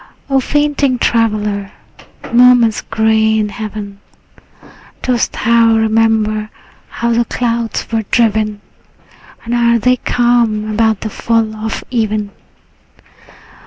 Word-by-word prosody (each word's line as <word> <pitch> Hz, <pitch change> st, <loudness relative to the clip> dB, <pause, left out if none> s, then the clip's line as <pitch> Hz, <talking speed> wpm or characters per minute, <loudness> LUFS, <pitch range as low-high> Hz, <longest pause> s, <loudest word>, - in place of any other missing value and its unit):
O 270 Hz, -, +4 dB
fainting 290 Hz, -1 st, 0 dB
traveller, 210 Hz, -4 st, -1 dB, 0.6 s
morn 245 Hz, 0 st, +6 dB
is 220 Hz, -2 st, 0 dB
gray 220 Hz, 0 st, +1 dB
in 210 Hz, -1 st, 0 dB
heaven. 205 Hz, -1 st, -7 dB, 1.0 s
Dost 245 Hz, -3 st, 0 dB
thou 230 Hz, 0 st, +3 dB
remember 220 Hz, -1 st, +1 dB, 0.4 s
how 235 Hz, 0 st, -2 dB
the 235 Hz, +1 st, +2 dB
clouds 235 Hz, -1 st, -2 dB
were 225 Hz, -1 st, 0 dB
driven? 215 Hz, -3 st, +1 dB, 0.8 s
And 235 Hz, -, -3 dB
are 235 Hz, -1 st, +3 dB
they 250 Hz, +3 st, +2 dB
calm 235 Hz, -4 st, +1 dB
about 220 Hz, -1 st, +1 dB
the 215 Hz, -, -5 dB
fall 225 Hz, -1 st, -1 dB
of 220 Hz, +1 st, -5 dB
even? 215 Hz, -3 st, -1 dB
225 Hz, 110 wpm, -15 LUFS, 215-235 Hz, 1.0 s, morn